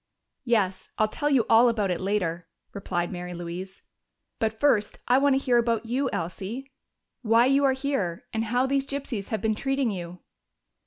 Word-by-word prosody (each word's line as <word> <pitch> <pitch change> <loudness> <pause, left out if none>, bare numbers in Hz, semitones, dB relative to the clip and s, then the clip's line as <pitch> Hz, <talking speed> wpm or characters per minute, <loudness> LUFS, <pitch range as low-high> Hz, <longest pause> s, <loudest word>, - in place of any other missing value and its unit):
"Yes, 205 -6 0
I'll 215 - +3
tell 290 +7 -2
you 265 -6 +3
all 230 +2 +6
about 210 -5 0
it 175 - -2
later," 180 -4 -1 0.3
replied 175 -3 -2
Mary 180 -1 -6
Louise. 175 +3 -7 0.6
"But 220 0 -1
first 220 -7 +2
I 250 +2 +5
want 280 -1 +4
to - - +2
hear 245 -3 +3
about 230 -1 0
you, 255 +3 0
Elsie: 195 +11 -5 0.5
why 230 0 +4
you 275 +2 +3
are 265 - +4
here, 260 -11 -2
and 225 0 -1
how 245 +4 +1
these 275 0 0
gypsies 270 -8 -4
have 220 - -2
been 220 -1 +1
treating 270 +1 0
you." 175 -2 -6
225 Hz, 175 wpm, -26 LUFS, 190-265 Hz, 0.6 s, all